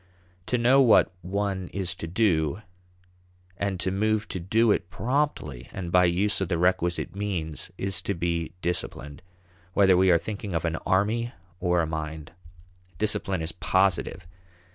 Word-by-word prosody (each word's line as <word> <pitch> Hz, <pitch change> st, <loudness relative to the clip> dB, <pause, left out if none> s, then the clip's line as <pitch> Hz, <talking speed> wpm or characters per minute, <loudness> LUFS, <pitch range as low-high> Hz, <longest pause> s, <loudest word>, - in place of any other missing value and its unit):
To 125 Hz, -, +1 dB
know 125 Hz, +3 st, +5 dB
what 120 Hz, -4 st, +5 dB
one 95 Hz, 0 st, -2 dB
is 90 Hz, -2 st, -3 dB
to 80 Hz, -, -5 dB
do 90 Hz, -2 st, +1 dB, 0.9 s
and 100 Hz, 0 st, -2 dB
to 95 Hz, -, -1 dB
move 110 Hz, +2 st, 0 dB
to 95 Hz, -, -3 dB
do 110 Hz, +6 st, +3 dB
it 90 Hz, -, 0 dB
promptly 125 Hz, -, -2 dB
and 90 Hz, -3 st, -5 dB
by 90 Hz, 0 st, +5 dB
use 95 Hz, +4 st, +1 dB
of 95 Hz, -, 0 dB
the 85 Hz, -1 st, 0 dB
requisite 90 Hz, +1 st, 0 dB
means 90 Hz, -7 st, -3 dB
is 95 Hz, -2 st, -1 dB
to 100 Hz, -, -2 dB
be 85 Hz, -1 st, -2 dB
disciplined, 75 Hz, -4 st, -3 dB, 0.5 s
whether 95 Hz, -2 st, +6 dB
we 95 Hz, +1 st, +4 dB
are 85 Hz, -, +6 dB
thinking 100 Hz, +2 st, -5 dB
of 85 Hz, -, -1 dB
an 80 Hz, -1 st, -1 dB
army 110 Hz, +6 st, +1 dB, 0.3 s
or 90 Hz, -1 st, +2 dB
a -, -, 0 dB
mind. 80 Hz, 0 st, -5 dB, 0.7 s
Discipline 95 Hz, -4 st, 0 dB
is 80 Hz, -, -2 dB
positive. 95 Hz, -1 st, +1 dB
95 Hz, 155 wpm, -26 LUFS, 85-100 Hz, 0.9 s, whether